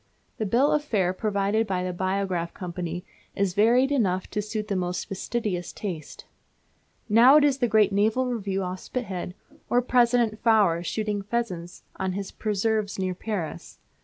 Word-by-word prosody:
The 215 - -1
bill 250 +8 +3
of 300 -1 +2
fare 195 -10 +1
provided 205 +2 0
by 185 -2 -1
the 180 0 -3
Biograph 185 -2 -2
Company 180 -1 -5 0.3
is 195 -2 0
varied 240 +7 +4
enough 190 -9 +1
to 210 - -1
suit 215 0 -4
the 200 - -1
most 180 -1 -2
fastidious 195 -2 -3
taste. 170 -8 -7 0.8
Now 235 +5 +7
it 300 - +6
is 280 -2 +2
the 245 - +2
great 215 -2 +4
Naval 220 +6 +2
Review 200 -6 -2
off 185 0 -4
Spithead, 185 -8 -5 0.3
or 245 - +4
President 240 -3 +2
Faure 210 -7 +4
shooting 210 +1 -2
pheasants 195 -5 -4
on 190 -1 -2
his 195 0 -5
preserves 215 0 -1
near 185 -1 -1
Paris. 185 -4 -5
205 Hz, 160 wpm, -26 LUFS, 185-230 Hz, 0.8 s, Now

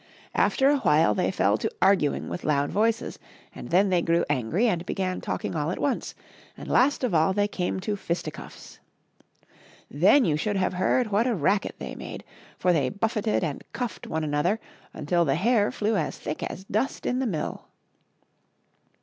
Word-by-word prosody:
After 270 - +3
a 290 -1 +3
while 150 - +4
they 95 - 0
fell 100 +2 +1
to - - -1
aiding 190 -6 +2
with - - -5
loud 145 -1 +1
voices, 225 +2 0 0.3
and - - -9
then 190 +4 +4
they 180 -2 +2
grew 170 0 +1
angry 155 - +1
and 175 -6 0
began 185 0 -2
talking - - -3
all 150 0 -1
at 180 - -3
once, 280 -3 -2 0.4
and - - -9
last 275 +1 +3
of 240 -7 0
all 160 +4 +3
they 205 +1 +1
came 185 -2 -2
to 205 +2 -2
fisticuffs. 175 -3 -6 1.1
Then 285 -3 +5
you 155 -4 +1
should 205 +6 -1
have 185 -1 0
heard 210 +5 +1
what 215 +5 +2
a 240 - +1
racket 190 +4 0
they - - -6
made! - - -8 0.3
for 180 - +2
they 140 -6 +1
buffeted 215 - -1
and 150 -4 -3
cuffed 245 -4 -4
one 160 0 -2
another 155 +8 0 0.3
until 170 +3 0
the 135 -4 +1
hair 210 +4 +2
flew 215 +1 0
as 160 -6 -2
thick 150 - -5
as 190 - -5
dust 215 +7 -2
in 250 - 0
the 265 - 0
mill. 170 -8 -4
185 Hz, 180 wpm, -26 LUFS, 160-215 Hz, 1.1 s, Then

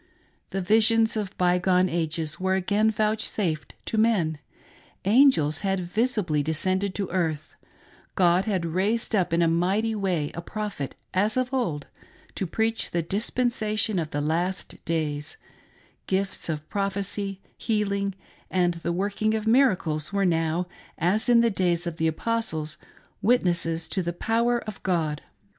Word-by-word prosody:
The 195 - -2
visions 225 +3 +4
of 205 -4 -4
by 180 0 +3
gone 185 0 +3
ages 160 -2 -2
were 190 0 +1
again 205 +4 +2
vouchsafed 215 -6 -1
to 220 - -1
men; 180 -9 +2 0.7
angels 200 - +4
had 195 -1 0
visibly 180 - 0
descended 185 +6 0
to 200 -2 -2
earth; 160 -4 -2 0.6
God 180 0 +3
had 190 -5 -1
raised 205 +8 0
up 180 -3 +1
in 170 +1 +3
a - - +3
mighty 190 +7 +1
way 185 -8 -1
a 170 - -5
Prophet, 205 -7 -5 0.2
as 205 +5 +1
of 255 +1 -1
old, 170 - -1 0.5
to 190 - -3
preach 225 +5 -1
the 170 -1 -1
dispensation 215 +1 0
of 160 -2 -3
the 145 - -2
last 170 +5 -2
days; 150 -3 -2 0.7
gifts 195 -2 -1
of 155 -1 -3
prophecy, 200 0 -2 0.2
healing, 200 -3 -1 0.3
and 175 -2 +2
the 170 0 -3
working 205 +4 0
of 220 0 -2
miracles 185 - +2
were 200 -1 +1
now, 165 0 +1 0.3
as 195 +9 +2
in 235 -1 +6
the 235 -1 +3
day's 175 -3 +1
of 170 -2 -4
the 160 - +1
Apostles, 160 -4 -2 0.4
witnesses 170 -8 +2
to 190 - 0
the 170 -1 -3
power 235 +6 +1
of 215 -2 -8
God. 160 -5 -1
190 Hz, 145 wpm, -26 LUFS, 165-215 Hz, 0.7 s, in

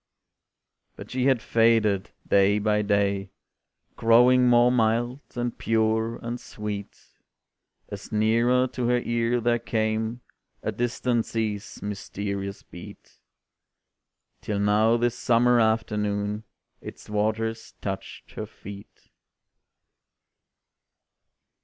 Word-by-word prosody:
But - - -11
she 130 0 0
had 130 -4 +2
faded, 115 -4 +2 0.2
day 100 +1 +4
by 105 0 +1
day, 100 -1 0 0.7
Growing 125 +2 +5
more 120 0 +5
mild, 120 +2 +1 0.2
and 120 -1 -2
pure, 110 0 0
and 120 +1 -5
sweet, 105 -1 -7 0.9
As 100 +2 -8
nearer 115 +4 +3
to 125 -1 -2
her 125 0 +3
ear 120 0 0
there 120 0 +1
came 110 +1 -2 0.4
A - - -1
distant 120 -1 -1
sea's 105 -3 -3
mysterious 100 -1 -5
beat, - - -13 1.2
Till 105 - -3
now 105 +3 +3
this 120 0 0
summer 120 0 +3
afternoon, 105 -1 0 0.4
Its - - -10
waters 110 +2 -2
touched 95 -1 -6
her - - -6
feet. 100 0 -13
110 Hz, 100 wpm, -25 LUFS, 105-120 Hz, 1.2 s, Growing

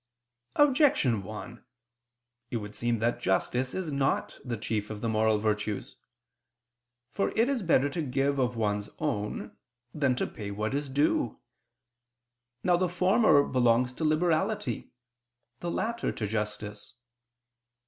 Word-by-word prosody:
Objection 260 - +4
1: 105 +2 -8 0.9
It 120 - -1
would 105 -1 -6
seem 120 0 0
that 115 +2 0
justice 125 +7 0
is 185 -5 -3
not 140 +10 0
the 120 -3 -3
chief 105 -1 -2
of 110 -1 -5
the 115 - -2
moral 110 -1 +3
virtues. 105 -1 -2 1.2
For 195 - 0
it 230 +2 +4
is 270 -4 0
better 160 -6 +3
to 165 - -2
give 140 0 0
of 125 -1 +1
one's 105 -2 -1
own 105 0 -3 0.4
than 140 -4 +2
to - - 0
pay 105 -2 -7
what 105 +4 -2
is 145 0 -2
due. 140 -3 +1 1.2
Now 180 -1 +4
the 180 0 +1
former 180 -2 +4
belongs 125 -1 +2
to 160 - -5
liberality, 175 +7 0 0.7
the 175 - -3
latter 235 +6 -1
to 110 - -4
justice. 105 +2 -4
125 Hz, 135 wpm, -29 LUFS, 105-165 Hz, 1.2 s, Objection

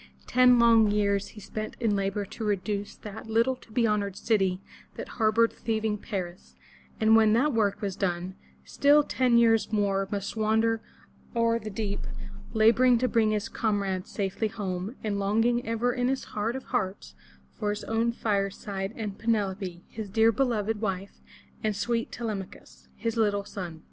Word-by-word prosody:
Ten 250 0 +5
long 230 -2 +6
years 200 -1 +1
he 215 - -12
spent 215 +1 -6
in 225 -3 +1
labor 195 +1 -1
to 220 - -8
reduce 205 0 -2
that 215 +1 -9
little 230 +4 +2
to 225 - -19
be 235 +1 +2
honored 205 -3 0
city 195 -4 +1 0.4
that - - -6
harbored 225 +1 +3
thieving 220 -2 -2
Paris, 185 -5 -6 0.4
and 220 0 +5
when 220 -1 +5
that 270 +5 +3
work 210 -2 +1
was 195 -2 -2
done, 180 -1 -2 0.3
still 290 +1 +4
ten 255 -4 +2
years 225 -2 +4
more 200 -2 +1
must 200 0 -3
wander 220 +1 +1 0.5
o'er 230 0 +2
the 215 -1 -6
deep, 205 -1 -4 0.4
laboring 235 +3 +5
to 255 +2 +1
bring 225 -3 +2
his 215 0 -1
comrades 200 -4 -1
safely 200 +2 -2
home, 195 +1 -4
and 205 -2 -1
longing 225 +5 +2
ever 230 +2 0
in 245 -1 0
his 265 0 -1
heart 215 +3 -3
of 265 - -5
hearts 190 - -3 0.5
for 210 - 0
his 205 0 -3
own 225 +1 0
fireside, 200 -2 -2
and 210 -3 -5
Pe 225 - -12
neFo 205 -4 +1
pe, 180 -3 -6
his 215 -2 -7
dear 225 +3 +4
beloved 225 -3 0
wife, 195 -2 -4 0.4
and 215 -1 0
sweet 230 +3 -1
Te 240 - -7
lem'a 205 -4 -3
chus, - - -17
his 230 0 -3
little 205 -2 +1
son. 175 -6 -7
215 Hz, 175 wpm, -27 LUFS, 200-230 Hz, 0.5 s, long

